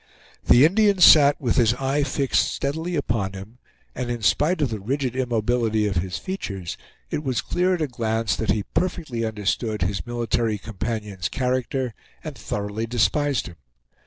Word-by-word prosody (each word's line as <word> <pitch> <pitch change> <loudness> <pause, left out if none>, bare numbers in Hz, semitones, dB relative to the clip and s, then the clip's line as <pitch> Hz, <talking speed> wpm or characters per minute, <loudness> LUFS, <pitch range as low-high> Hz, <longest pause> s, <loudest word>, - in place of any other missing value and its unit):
The 125 +4 +7
Indian 200 +3 +3
sat 145 -4 +7
with 120 -5 0
his 120 -1 +4
eye 135 +2 0
fixed 140 -1 +1
steadily 160 +5 -3
upon 110 -9 -1
him, 100 +6 -10 0.3
and 125 -2 -4
in 120 -2 -4
spite 155 - +2
of 130 - -1
the 110 - -3
rigid 130 +4 -2
immobility 115 -3 0
of 100 -3 -1
his 90 +1 -2
features, 100 - -5 0.4
it 150 - -2
was 130 -4 -1
clear 180 +1 +1
at 165 - -2
a - - -1
glance 115 -4 -1
that 110 - -3
he 105 - +1
perfectly 160 - -2
understood 110 -1 -1
his 95 +5 -3
military 115 -2 -1
companion's 105 -2 -4
character 130 -1 -1 0.3
and - - -6
thoroughly 105 +2 -4
despised 135 +4 +1
him. 85 - -10
120 Hz, 160 wpm, -23 LUFS, 105-140 Hz, 0.4 s, The